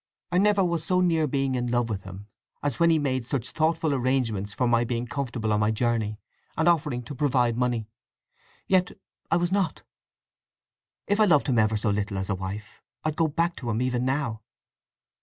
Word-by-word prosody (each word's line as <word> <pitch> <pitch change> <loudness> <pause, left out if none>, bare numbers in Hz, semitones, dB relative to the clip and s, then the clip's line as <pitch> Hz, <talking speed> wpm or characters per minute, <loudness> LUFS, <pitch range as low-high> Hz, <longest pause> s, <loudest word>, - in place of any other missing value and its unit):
I 180 - +3
never 200 -1 +4
was 170 -2 -1
so 180 +3 +2
near 165 -4 +2
being 135 -1 0
in 125 -1 -1
love 120 -1 +1
with 100 -4 -4
him 95 +1 -9 0.4
as 145 -5 0
when 170 - +5
he 165 - +4
made 130 -4 0
such 125 0 -3
thoughtful 160 -1 +1
arrangements 120 -6 0
for 125 +4 0
my 120 0 +3
being 120 0 -2
comfortable 120 -4 -2
on 105 - +2
my 105 0 +2
journey, 110 -1 0 0.4
and 160 - +2
offering 150 -7 +2
to 145 - -8
provide 125 -4 +1
money. 120 -3 -1 0.8
Yet 185 -1 +2 0.4
I 165 - +3
was 175 0 0
not. 195 -1 0 1.2
If 205 +1 0
I 215 - +6
loved 155 -8 +4
him 120 -3 +3
ever 110 0 +2
so 105 0 0
little 100 -1 -2
as 95 +1 -2
a - - +1
wife, 95 +3 -7 0.2
I'd 155 -1 -1
go 165 0 +2
back 170 +3 0
to 120 - -5
him 110 0 0
even 125 -1 0
now." 130 -4 -1
125 Hz, 195 wpm, -26 LUFS, 110-160 Hz, 1.2 s, I